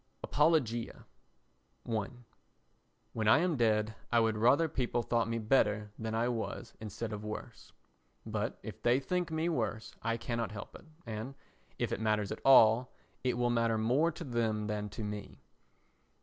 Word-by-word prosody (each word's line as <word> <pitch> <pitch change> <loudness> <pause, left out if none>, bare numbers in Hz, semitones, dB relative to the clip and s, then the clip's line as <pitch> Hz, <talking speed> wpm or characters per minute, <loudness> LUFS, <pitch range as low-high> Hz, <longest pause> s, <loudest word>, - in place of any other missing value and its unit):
Apologia 145 -7 +1 0.8
i 110 -3 -1 1.1
When 110 -1 -1
I - - +7
am 175 -2 +1
dead 110 -3 +2 0.2
I 120 - +5
would 110 -1 +2
rather 125 +9 +4
people 120 -4 -1
thought 115 -1 +1
me 115 - -1
better 105 -3 +2
than 110 0 -3
I 115 +2 +1
was 120 -2 -4
instead 110 +1 -5
of 105 0 -5
worse; 105 0 -7 0.5
but - - -2
if - - -8
they 120 +2 +3
think 180 +5 -1
me 160 +1 -1
worse, 115 -8 -2
I 115 0 -1
cannot 115 -2 -3
help 105 0 -8
it - - -13 0.2
and, 115 +4 -5 0.4
if 120 -2 -1
it - - -1
matters 105 -2 +1
at - - -5
all, 125 -2 +6 0.3
it 125 -2 0
will 120 0 +2
matter 115 -1 +2
more 130 +10 +2
to 170 - -7
them 115 -5 -1
than 105 0 -3
to 110 +2 -6
me. 105 -1 -6
115 Hz, 165 wpm, -32 LUFS, 110-125 Hz, 1.1 s, I